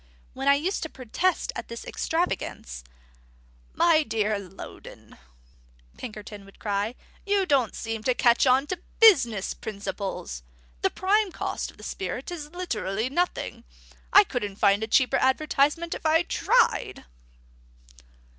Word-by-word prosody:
When 270 +1 -4
I 280 - +7
used 345 +8 -1
to 320 - -4
protest 300 +9 -1
at - - -6
this 235 0 -8
extravagance, 195 - -3 0.9
"My 330 -2 +5
dear 215 -7 0
Loudon," 190 -1 -11 0.8
Pinkerton 210 -3 -8
would 195 0 -17
cry, 205 +3 -2 0.3
"you 400 -1 +1
don't 275 - +2
seem 225 -1 -4
to 255 - +2
catch 240 +2 +4
on 260 +2 +4
to 355 +3 -5 0.2
business 240 - +5
principles! 195 - -5 0.4
The - - +3
prime 400 +1 +1
cost - - -3
of - - -16
the - - -13
spirit - - -5
is 305 -4 -6
literally 235 - -2
nothing. 350 +4 -2 0.5
I - - +9
couldn't 205 -3 -4
find 200 +1 +3
a 220 - -2
cheaper 260 +3 +3
advertisement 295 +5 +1
if - - -7
I 320 +1 +4
tried." - - +1
255 Hz, 135 wpm, -26 LUFS, 210-330 Hz, 0.9 s, I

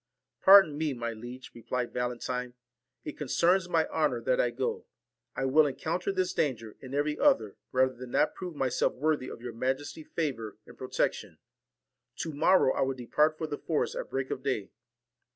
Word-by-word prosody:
' - - -60
Pardon 190 -7 +8
me, 155 -3 0
my 115 -1 -3
liege,' 120 +3 -9
replied 120 +1 -4
Valentine; 125 0 -3 0.5
'it 150 - -7
con 150 - -4
cerns 180 +5 +3
my 165 -2 +2
honour - - +1
that - - +1
I - - +1
go. 460 -1 -3 0.5
I 135 - -1
will 150 +3 +5
encounter 160 +7 -2
this 185 -1 -1
danger, 115 -7 -2
and 130 +1 -7
every 150 +1 0
other, 110 -3 +3 0.2
rather 130 0 +3
than 125 0 -9
not 150 - +2
prove 180 -3 -7
myself 135 -3 0
worthy 145 -1 0
of 115 - -10
your 120 -1 -5
majesty's 135 +6 -3
favour 120 -11 -3
and 120 - -14
pro 130 - -7
tection. - - -1 0.8
To 160 - -4
morrow 155 -1 +4
I - - -1
will 135 0 +1
depart 150 +5 +1
for 160 - -3
the 150 -2 -5
forest 160 -3 -1
at - - -5
break 135 0 -3
of - - -3
day.' 130 -7 -2
135 Hz, 190 wpm, -29 LUFS, 125-160 Hz, 0.8 s, Pardon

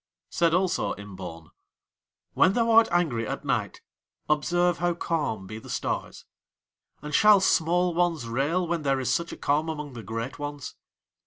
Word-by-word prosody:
Said 170 -1 +2
also 185 0 0
Imbaun: 95 -5 -9 0.8
"When 185 - +4
thou 230 0 +2
art 225 0 +7
angry 145 -11 0
at - - -5
night - - -2 0.5
observe 175 +3 +1
how 175 0 0
calm 145 - -2
be 110 +3 -8
the - - -13
stars; - - -4 0.8
and 150 0 -6
shall 210 +5 +6
small 175 -1 +2
ones 165 -7 0
rail 145 +10 0
when 170 -1 -1
there 135 -2 +1
is 130 - 0
such 170 0 -2
a - - -8
calm 150 +3 0
among 150 -3 -5
the 120 - -7
great 115 +6 -5
ones? 145 -2 -6
155 Hz, 160 wpm, -26 LUFS, 125-175 Hz, 0.8 s, art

